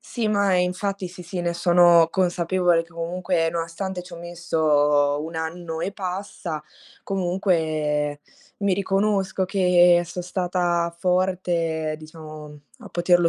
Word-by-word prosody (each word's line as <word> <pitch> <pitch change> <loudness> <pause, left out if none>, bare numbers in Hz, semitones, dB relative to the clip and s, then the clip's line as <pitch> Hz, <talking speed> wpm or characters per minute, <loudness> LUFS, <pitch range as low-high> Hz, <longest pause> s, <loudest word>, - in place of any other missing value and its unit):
Sì, 235 -3 -3
ma 200 -2 +2
infatti 185 +2 -1
sì, 180 0 -11
sì, 175 +1 -5
ne 170 0 -1
sono 175 -1 +5
consapevole 175 -1 +2
che 165 - -20
comunque 170 0 -1
nonostante 170 +3 -4
c'ho 175 -1 -11
messo 150 -4 +1
1 165 +1 -7
anno 160 0 -4
e 195 - -2
passa, 185 -4 -5 0.4
comunque 160 -6 0 0.4
mi 200 -2 +1
riconosco 195 0 0
che 180 -2 +4
so' 180 +1 -6
stata 175 -1 -1
forte, 175 -4 0
diciamo, 155 -1 -11 0.2
a - - -10
poterlo 175 0 +3
175 Hz, 120 wpm, -23 LUFS, 165-185 Hz, 0.4 s, sono